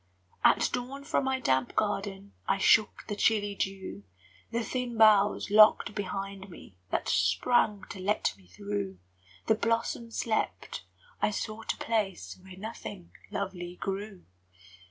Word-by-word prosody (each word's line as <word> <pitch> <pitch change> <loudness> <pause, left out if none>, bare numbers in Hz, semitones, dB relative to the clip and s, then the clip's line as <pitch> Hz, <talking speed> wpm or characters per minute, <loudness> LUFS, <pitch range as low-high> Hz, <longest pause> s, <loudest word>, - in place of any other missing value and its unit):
At - - +4
dawn 260 +3 -4
from 280 -2 0
my 265 0 0
damp 130 - +1
garden 200 -1 -2
I - - +2
shook 210 +2 +3
the 205 - -3
chilly 205 -1 +2
dew; 195 - -4 0.5
The 235 0 -1
thin 245 -1 -3
boughs 210 -2 +5
locked 215 0 +6
behind 195 -1 -5
me 135 - -13
That - - -1
sprang 200 - +2
to 195 - -7
let 200 +3 0
me 95 -2 -22
through; 100 +1 -4 0.5
The - - +4
blossoms 230 +1 -1
slept, 220 -2 -2 0.4
I - - +3
sought 215 +1 -3
a - - -16
place 210 -5 -2
Where 185 0 -12
nothing 205 -3 -8 0.2
lovely 180 -3 -4
grew. 195 0 -5
205 Hz, 135 wpm, -29 LUFS, 190-225 Hz, 0.5 s, locked